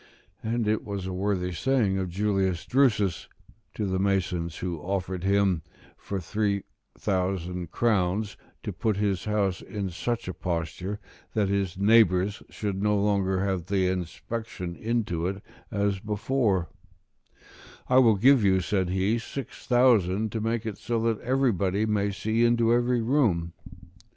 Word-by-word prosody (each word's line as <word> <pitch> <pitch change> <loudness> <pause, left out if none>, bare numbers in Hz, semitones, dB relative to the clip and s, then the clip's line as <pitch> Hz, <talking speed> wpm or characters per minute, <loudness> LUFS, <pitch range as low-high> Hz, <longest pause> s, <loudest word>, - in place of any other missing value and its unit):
And 115 0 -1
it 110 +1 +1
was 100 -2 -4
a 95 - -4
worthy 95 -1 -1
saying 105 -2 +1
of 95 -1 -2
Julius 95 -2 0
Drusus, 105 - +2 0.5
to 105 - -2
the 95 -1 -1
masons 90 -4 0
who 90 -3 -3
offered 95 +1 -3
him, 100 -3 +2 0.3
for 100 - -5
three 100 +2 -1 0.3
thousand 90 -3 -2
crowns, 105 -2 0 0.3
to - - -4
put 110 -3 0
his 100 -3 0
house 105 -3 0
in 100 -3 -4
such 115 +6 -3
a 90 - -3
posture 90 +4 -3 0.4
that 105 -3 +2
his 95 -3 -1
neighbours 100 -2 +4
should 100 -2 -3
no 105 0 +2
longer 100 -2 +1
have 95 -3 -2
the 95 -1 +1
same 95 0 0
inspection 90 0 -6
into 105 -7 -1
it 95 +1 -4 0.3
as 100 -2 0
before; 105 -3 0 1.2
"I 130 0 +5
will 115 -4 +6
give 125 +4 +5
you," 95 -1 +4
said 95 0 0
he, 95 +5 +1
"six 130 +2 -8
thousand 110 -5 +3
to 110 - -3
make 115 +1 -1
it 110 -3 -5
so 115 +2 -1
that 115 -2 0
everybody 110 -6 +1
may 105 -2 +1
see 110 +4 0
into 120 -1 +4
every 120 0 +2
room." 110 - +1
100 Hz, 150 wpm, -27 LUFS, 95-110 Hz, 1.2 s, will